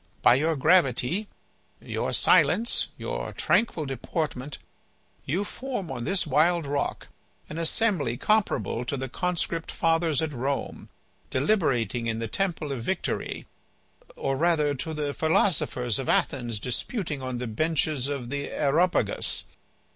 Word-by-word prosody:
By - - +8
your 155 +5 +2
gravity, 170 - +3 0.5
your - - -3
silence, 230 +2 +4
your - - -4
tranquil 175 -9 +1
deportment, 135 +1 -3 0.7
you 175 +9 0
form 225 - -5
on 120 -3 -4
this 195 -1 +1
wild 160 +3 +3
rock 140 0 -2 0.4
an 155 - -4
assembly 165 - +1
comparable 210 - +1
to 140 - -2
the 135 0 -3
Conscript 170 +2 -2
Fathers 165 -3 +1
at 160 -2 -1
Rome 135 +2 -3 0.4
deliberating 130 - +1
in 115 -1 -1
the 115 0 -3
temple 165 - -2
of 130 -4 -3
Victory, 180 +9 -2 0.7
or 135 - -1
rather, 155 -2 +2
to 155 +4 -4
the 145 -1 -2
philosophers 145 - +1
of 135 - -3
Athens 120 -5 +1
disputing 150 - -3
on 130 -1 -3
the 125 - -3
benches 150 +2 0
of 140 -4 -4
the 140 +1 -3
Areopagus. 150 - +1
150 Hz, 130 wpm, -27 LUFS, 130-170 Hz, 0.7 s, By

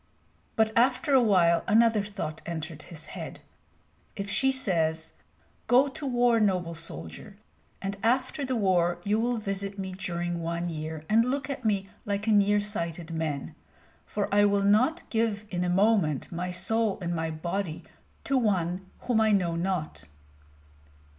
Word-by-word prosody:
But 220 0 +2
after 255 +5 +3
a 265 - +7
while 180 -7 +4
another 220 0 +4
thought 190 -7 -5
entered 160 -2 -5
his 165 -3 -8
head: - - -7 0.8
if 200 0 -4
she 265 0 +3
says, 165 -10 0 0.5
"Go 260 +3 +5
to 280 +1 -6
war, 245 -2 +3
noble 180 -5 +1
soldier, 165 - -9 0.5
and 195 +1 -2
after 255 +5 +1
the 260 -1 -1
war 180 -5 +2
you 210 +3 +1
will 240 +1 0
visit 200 -1 -3
me 190 -1 -4
during 175 -2 -3
one 170 +1 -2
year 155 0 -5
and 225 +2 +4
look 270 +3 -2
at 255 - -5
me 200 -3 +1 0.2
like 205 0 -2
a 225 - +2
nearsighted 205 -5 +1
man, 155 -4 -3 0.5
for 205 - -2
I 205 0 +5
will 200 -1 +3
not 250 +12 +3
give 220 -2 0
in 180 -1 -1
a 180 - 0
moment 190 - +2
my 180 +1 -3
soul 200 +4 0
and 175 -2 -2
my 160 0 -1
body 170 +2 -3 0.4
to 270 -1 +1
one 185 -4 0
whom 235 -3 +1
I 220 -1 +4
know 180 -5 +2
not!" 170 - -2
195 Hz, 155 wpm, -28 LUFS, 170-225 Hz, 0.8 s, a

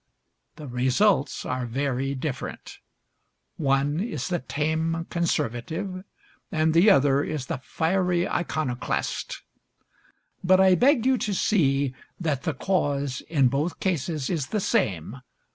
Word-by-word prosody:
The 150 - -9
results 130 +6 +1
are 125 -1 -2
very 135 +2 -1
different: 135 0 -5 0.8
one 140 +1 +1
is 215 -1 -3
the 175 -1 0
tame 160 +4 -1
conservative 170 - -2 0.5
and 155 0 +2
the 175 +6 +6
other 140 -6 +4
is 150 -5 -3
the 130 - -4
fiery 175 +5 0
iconoclast; 155 -7 -2 1.0
but 185 +1 +5
I 190 -1 +6
beg 250 +4 +4
you 260 -2 +3
to 205 -2 -1
see 140 -10 +2 0.3
that 155 -6 -1
the 160 -3 -2
cause 140 -6 -1
in 140 -5 +4
both 145 +6 -2
cases 160 -5 -1
is 155 -7 -1
the 215 - -1
same. 110 - 0
155 Hz, 125 wpm, -25 LUFS, 135-180 Hz, 1.0 s, the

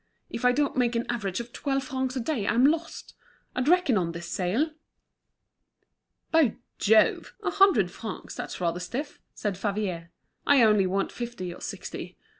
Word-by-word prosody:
"If 235 - -3
I 250 - +7
don't 285 +2 0
make 245 -2 +1
an 230 - 0
average 200 -5 -2
of 235 0 -7
twelve 275 -1 -1
francs 260 -1 -2
a - - -1
day, 235 -4 -1
I'm 240 +4 +4
lost. 325 +3 -1 0.4
I'd 255 +1 0
reckoned 325 - +4
on 170 -2 -2
this 170 0 -7
sale." 220 - 0 1.6
"By 320 -9 +4 0.2
Jove! 215 +1 +3
a 380 - 0
hundred 370 - +4
francs; 215 +1 -7
that's - - -6
rather 175 -1 0
stiff," 255 +11 -5
said 200 -3 -3
Favier. 195 -5 -2 0.4
"I 280 -4 +6
only 210 -3 +5
want 195 +1 -1
fifty 235 -7 -5
or - - -13
sixty. - - -6
235 Hz, 165 wpm, -27 LUFS, 195-270 Hz, 1.6 s, I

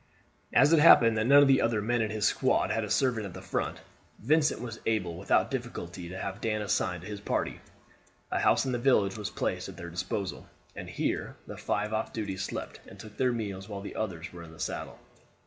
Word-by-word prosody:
As 150 - +5
it 165 - +6
happened 115 -7 +7
that 110 - +1
none 145 +2 +8
of - - +4
the 135 -1 +5
other 115 -2 +1
men 120 +3 0
in 110 - 0
his 105 -1 -1
squad - - +2
had 115 - 0
a 105 - -5
servant 110 -1 +1
at 90 - -10
the - - -7
front, - - -3 0.4
Vincent 155 0 +2
was 115 -2 -6
able 95 -7 0
without 95 +9 +1
difficulty 90 -9 -5
to 90 - -7
have 95 +2 -5
Dan 110 -1 -1
assigned 90 -3 -1
to - - -8
his 105 -1 -6
party. - - -2 0.7
A - - +1
house - - +3
in 130 - -1
the 120 - -1
village 115 -6 +3
was 105 -1 -4
placed - - -3
at - - -10
their 85 0 -7
disposal, 95 +2 -4 0.3
and - - -7
here - - -2
the - - -8
five 105 +1 -2
off 110 - -1
duty 105 -4 -3
slept 95 - -5
and 95 - -13
took 105 0 -11
their 130 -1 +2
meals 100 -4 -4
while 100 -2 -5
the 100 - -8
others 90 -6 -4
were 85 - -9
in 85 - -10
the 80 - -15
saddle. - - -4
105 Hz, 225 wpm, -29 LUFS, 95-120 Hz, 0.7 s, none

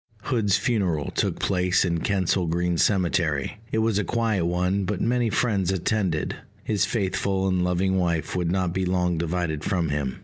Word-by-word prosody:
Hood's 105 -6 +1
funeral 90 - 0
took - - -1
place 90 0 +1
in 85 -2 0
Kensal 95 -1 0
Green 85 +1 0
Cemetery: 85 -4 +1
it - - 0
was 110 -3 +1
a - - 0
quiet 110 -4 0
one, 90 +3 0
but 95 0 -2
many 120 -1 +1
friends 100 -5 +1
attended. 95 -3 -1 0.3
His 105 -2 +1
faithful 95 -3 -1
and 90 -1 +1
loving 90 +2 +1
wife 85 -3 -1
would 90 -2 0
not 90 -2 0
be 95 - -1
long 90 -2 0
divided 85 -2 -2
from 85 -3 0
him. 70 -3 -2
90 Hz, 170 wpm, -25 LUFS, 85-100 Hz, 0.3 s, Hood's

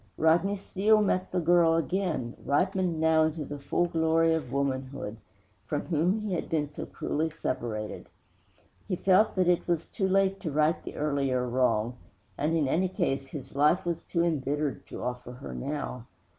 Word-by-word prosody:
_ - - -31
V - - -5
Rodney 175 +5 +4
Steele 205 +2 +2
met 190 -3 +1
again - - -31
the 180 -3 -1
girl 170 -1 +5 0.7
ripened 180 +2 +1
now 160 0 +4
into 155 -1 -2
the 145 +1 -6
full 175 +5 0
glory 165 -1 +2
of 150 -7 -2
womanhood 135 -4 -2 0.5
from - - -1
whom 175 +4 +1
he 210 -3 -3
had 170 - -3
been 155 -2 0
so - - -6
cruelly 160 +2 -2
separated. 120 -8 -4 0.8
He 190 - 0
felt 195 +4 +3
that 185 -2 +2
it 180 -1 +2
was 170 -2 0
too 195 - -2
late 195 0 +2
to 165 - -4
right 155 +3 +2
the - - -7
earlier 135 -4 0
wrong; 120 -1 +1 0.4
and, 155 +3 0
in 155 -4 +2
any 180 +7 +1
case, 140 -8 -1
his 135 -1 -8
life 150 +6 +3
was 170 -1 -2
too 170 - 0
embittered 145 -3 -1
to - - -7
offer 125 0 -4
her 125 +3 -8
now. 135 -4 -4
160 Hz, 180 wpm, -28 LUFS, 135-175 Hz, 0.8 s, girl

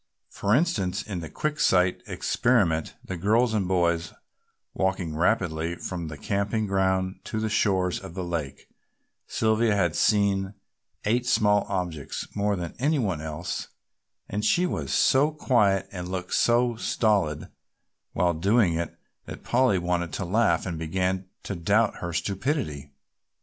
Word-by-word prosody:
For 100 +2 +1
instance, 120 - 0
in 90 -5 -5
a 80 - -7
Quick 155 - -3
sight 90 -1 +3
experiment, 95 -11 +1
the 95 - -4
girls 110 +6 +2
and 100 -4 0
boys 85 -2 +1 0.6
walking 95 -4 -1
rapidly 85 -2 0
from 85 -1 -5
the 75 -1 -7
camping 100 +6 -1
ground 95 -1 0
to 110 - -3
the 110 0 -1
shores 95 -4 +1
of 85 - -10
the 95 - -3
lake, 85 -6 -4 0.6
Sylvia 110 0 +2
had 85 -5 +1
seen 100 -2 +2 0.5
eight 120 +3 +1
small 105 -4 +3
objects 90 -7 -3
more 105 0 +1
than 85 -3 -5
any 150 +4 +2
one 95 - -1
else 80 +2 -4 0.6
and 105 +1 -3
she 180 - +3
was 180 - -3
so 140 +3 +4
quiet 105 -10 +2
and 90 -2 -6
looked 90 -1 -4
so 120 0 +3
stolid 100 -11 0 0.6
while 90 -1 +2
doing 95 +3 +3
it 85 +1 -3 0.3
that - - -8
Polly 125 -5 +3
wanted 85 -1 -1
to 100 - -3
laugh, 110 +6 +2
and 85 -4 -4
began 95 +3 -1 0.2
to - - -4
doubt 100 +5 +1
her 85 - -4
stupidity. 95 - -2
95 Hz, 145 wpm, -26 LUFS, 85-110 Hz, 0.6 s, so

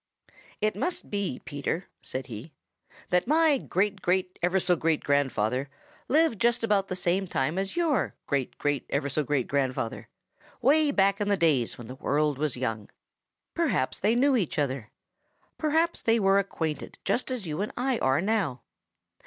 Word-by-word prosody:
"It 215 0 +1
must 355 0 -3
be, 200 -9 -2
Peter," 145 +5 -3 0.2
said 130 0 -3
he, 120 +5 -8 0.6
"that 180 +4 +2
my 310 -1 +4
great 195 0 -1
great 180 0 0
ever 180 +2 +2
so 180 -1 +2
great 160 -1 0
grandfather 135 -2 +1 0.4
lived 305 -6 +2
just 235 0 +2
about 205 -3 +2
the 185 - -3
same 185 +2 +1
time 155 +2 0
as 195 0 -3
your 330 -6 +1
great 140 -3 -2
great 145 -1 -1
ever 140 - 0
so 150 +3 0
great 140 -3 0
grandfather, 130 -4 -2 0.5
way 300 +3 +4
back 200 -5 +2
in 205 - 0
the 200 - +3
days 150 -9 +2
when 120 - -9
the 125 - -8
world 145 +1 0
was 150 -4 -1
young. 115 -5 -3 0.6
Perhaps 250 - 0
they 215 +4 +2
knew 270 +2 +4
each 195 -10 -1
other. 135 -6 -1 0.7
Perhaps 320 +2 +1
they 230 0 +3
were 195 -1 +4
acquainted 160 -6 -3
just 255 - 0
as 250 -6 -3
you 155 +2 -3
and 210 - -2
I 250 -1 0
are 135 +4 +2
now. 190 - 0
180 Hz, 170 wpm, -27 LUFS, 140-225 Hz, 0.7 s, my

